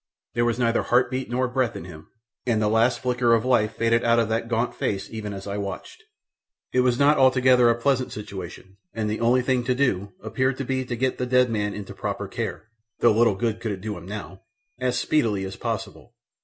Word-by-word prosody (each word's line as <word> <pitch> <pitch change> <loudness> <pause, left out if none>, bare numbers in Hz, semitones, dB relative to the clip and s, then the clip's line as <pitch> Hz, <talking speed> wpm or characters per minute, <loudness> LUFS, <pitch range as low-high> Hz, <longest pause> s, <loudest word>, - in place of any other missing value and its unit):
There 120 0 +1
was 120 -1 0
neither 120 -1 +2
heart 120 +1 +2
beat 130 +1 -3
nor 125 +1 0
breath 125 -1 -1
in 80 - -7
him, 80 -3 -11 0.4
and 115 -3 +2
the 105 - +1
last 115 +3 +2
flicker 125 -2 +3
of 115 - -1
life 115 -4 +2
faded 115 +1 +2
out 115 0 +3
of 115 -2 +2
that 115 +1 -1
gaunt 120 +1 0
face 95 -1 -2
even 110 -2 -5
as 95 -1 -7
I 100 0 -4
watched. 100 - -6 0.7
It 125 - +3
was 125 -1 +3
not 145 +2 +4
altogether 130 -2 +5
a 115 - +3
pleasant 130 0 +1
situation, 95 -2 -8 0.2
and 110 -2 -1
the 105 +1 -2
only 125 +2 +3
thing 125 -1 +1
to 125 - +1
do 100 -8 0
appeared 130 +4 0
to 135 - -3
be 130 0 -1
to 125 - -3
get 130 +2 -1
the 125 - -1
dead 125 -1 +3
man 105 -2 -1
into 105 -2 -7
proper - - -4
care 110 - -5 0.3
(though 120 - +4
little 115 -2 +3
good 110 +2 -1
it - - -20
could 105 -4 -3
do 105 0 -4
him 90 - -10
now!) 100 -2 -7 0.4
as 125 -1 0
speedily 115 -7 +1
as 95 0 -6
possible. - - -5
115 Hz, 225 wpm, -24 LUFS, 105-125 Hz, 0.7 s, altogether